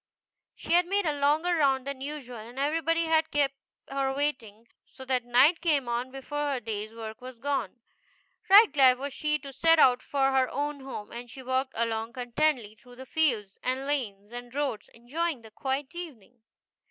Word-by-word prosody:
She -, -, -3 dB
had 350 Hz, 0 st, +4 dB
made 400 Hz, +1 st, +1 dB
a 305 Hz, -, +1 dB
longer 305 Hz, +5 st, +2 dB
round 270 Hz, -5 st, +2 dB
than 280 Hz, -1 st, -5 dB
usual, 275 Hz, -4 st, -6 dB
and 230 Hz, +4 st, -11 dB
everybody 330 Hz, +4 st, +1 dB
had 320 Hz, 0 st, +2 dB
kept 285 Hz, -2 st, +1 dB, 0.3 s
her 275 Hz, -1 st, -1 dB
waiting, 235 Hz, -6 st, -3 dB, 0.2 s
so 265 Hz, -, -12 dB
that 255 Hz, -2 st, 0 dB
night 255 Hz, +8 st, +4 dB
came 295 Hz, -7 st, +1 dB
on 240 Hz, +2 st, -2 dB
before 285 Hz, +2 st, -3 dB
her 260 Hz, -, -2 dB
day's 215 Hz, -2 st, -5 dB
work 225 Hz, 0 st, -8 dB
was 255 Hz, -1 st, -9 dB
done. 255 Hz, -5 st, -2 dB, 0.7 s
Right 410 Hz, +3 st, +8 dB
glad 260 Hz, -3 st, +6 dB
was 280 Hz, +1 st, -5 dB
she 300 Hz, +1 st, 0 dB
to 280 Hz, -2 st, -10 dB
set 325 Hz, +5 st, +4 dB
out 250 Hz, -4 st, +5 dB
for 270 Hz, -1 st, +1 dB
her 265 Hz, -1 st, +2 dB
own 290 Hz, +1 st, -3 dB
home, 265 Hz, -6 st, -8 dB
and 240 Hz, +1 st, -8 dB
she 260 Hz, +3 st, -10 dB
walked 260 Hz, +1 st, -1 dB
along 225 Hz, 0 st, -1 dB
contentedly 245 Hz, -2 st, 0 dB
through 245 Hz, +3 st, -17 dB
the 260 Hz, +1 st, -10 dB
fields, 235 Hz, -11 st, 0 dB
and 260 Hz, +2 st, -2 dB
lanes, 220 Hz, -8 st, -3 dB
and 245 Hz, +1 st, -8 dB
roads, 275 Hz, -7 st, -2 dB
enjoying 275 Hz, +3 st, -3 dB
the 220 Hz, -, -13 dB
quiet 265 Hz, +5 st, -3 dB
evening. 250 Hz, -, -10 dB
265 Hz, 185 wpm, -28 LUFS, 240-295 Hz, 0.7 s, Right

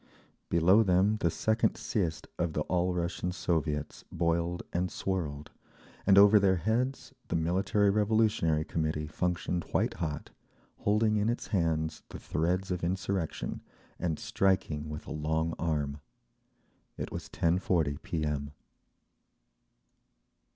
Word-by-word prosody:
Below 90 Hz, +6 st, +5 dB
them 100 Hz, +1 st, +3 dB
the 85 Hz, -, +1 dB
second 110 Hz, +7 st, +1 dB
siezd 85 Hz, -8 st, -2 dB
of 85 Hz, -2 st, 0 dB
the 75 Hz, -, -1 dB
All 90 Hz, +3 st, 0 dB
Russian 90 Hz, +1 st, -2 dB
Soviets 80 Hz, -4 st, -2 dB
boiled 85 Hz, +1 st, 0 dB
and 90 Hz, +1 st, 0 dB
swirled, 75 Hz, -6 st, -3 dB, 0.6 s
and 100 Hz, -1 st, +6 dB
over 100 Hz, +1 st, +8 dB
their 95 Hz, -1 st, +4 dB
heads 115 Hz, +9 st, -1 dB
the -, -, -2 dB
Military 95 Hz, +5 st, +2 dB
Revolutionary 105 Hz, -7 st, +2 dB
Committee 80 Hz, -1 st, -1 dB
functioned 90 Hz, +2 st, -1 dB
white -, -, 0 dB
hot, 75 Hz, -3 st, -4 dB, 0.5 s
holding 105 Hz, +1 st, +2 dB
in 105 Hz, +2 st, +1 dB
its 120 Hz, -, -3 dB
hands 80 Hz, -5 st, 0 dB
the -, -, -7 dB
threads 90 Hz, +4 st, -1 dB
of 90 Hz, -1 st, -2 dB
insurrection 95 Hz, -1 st, -2 dB, 0.4 s
and 80 Hz, -3 st, -1 dB
striking 80 Hz, -6 st, 0 dB
with 75 Hz, 0 st, -6 dB
a -, -, -6 dB
long 80 Hz, +2 st, -1 dB
arm…. 75 Hz, -3 st, -1 dB, 1.0 s
It -, -, -5 dB
was -, -, -6 dB
10.40 85 Hz, -4 st, +1 dB
P. 80 Hz, -2 st, -3 dB
M. 70 Hz, -1 st, -3 dB
85 Hz, 125 wpm, -30 LUFS, 80-95 Hz, 1.0 s, over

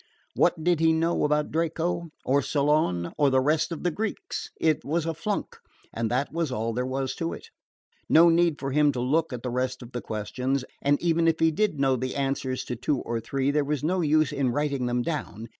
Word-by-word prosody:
What 160 Hz, -, +2 dB
did 175 Hz, -1 st, +2 dB
he 160 Hz, 0 st, +4 dB
know 165 Hz, 0 st, +1 dB
about 150 Hz, 0 st, +1 dB
Draco? 165 Hz, +1 st, -1 dB, 0.2 s
or 140 Hz, +2 st, +3 dB
Solon? 140 Hz, -, +1 dB
or 145 Hz, -2 st, +5 dB
the 130 Hz, 0 st, +3 dB
rest 150 Hz, +5 st, +1 dB
of 165 Hz, -, -5 dB
the 175 Hz, -, +1 dB
Greeks? 360 Hz, -, -4 dB
It 155 Hz, -2 st, +2 dB
was 160 Hz, +3 st, -1 dB
a 165 Hz, -, -1 dB
flunk, 195 Hz, +6 st, -3 dB, 0.4 s
and 115 Hz, -1 st, -1 dB
that 130 Hz, +6 st, -1 dB
was 165 Hz, -4 st, -1 dB
all 115 Hz, -1 st, -2 dB
there 125 Hz, +2 st, -2 dB
was 130 Hz, 0 st, -2 dB
to 165 Hz, 0 st, -2 dB
it. -, -, -10 dB, 0.6 s
No 165 Hz, +2 st, +7 dB
need 170 Hz, -2 st, +3 dB
for 135 Hz, -1 st, -3 dB
him 150 Hz, +1 st, +4 dB
to 125 Hz, -, -3 dB
look 155 Hz, +6 st, +1 dB
at 125 Hz, -2 st, -6 dB
the 125 Hz, -, -3 dB
rest 130 Hz, +1 st, -2 dB
of 120 Hz, -, -12 dB
the 120 Hz, -, -4 dB
questions, 125 Hz, +5 st, -2 dB, 0.2 s
and 145 Hz, +1 st, +2 dB
even 165 Hz, -1 st, +2 dB
if 165 Hz, -1 st, +2 dB
he 160 Hz, 0 st, +4 dB
did 195 Hz, -3 st, 0 dB
know 135 Hz, -1 st, +3 dB
the 130 Hz, +1 st, -3 dB
answers 135 Hz, -2 st, -1 dB
to 125 Hz, -, -4 dB
two 130 Hz, +4 st, -1 dB
or 115 Hz, -1 st, -3 dB
three, 135 Hz, +4 st, -1 dB
there 150 Hz, 0 st, +2 dB
was 145 Hz, 0 st, -2 dB
no 180 Hz, +4 st, +1 dB
use 155 Hz, -2 st, +3 dB
in 140 Hz, -3 st, 0 dB
writing 140 Hz, -1 st, -1 dB
them 120 Hz, 0 st, 0 dB
down. 115 Hz, -8 st, -4 dB
145 Hz, 225 wpm, -26 LUFS, 130-165 Hz, 0.6 s, No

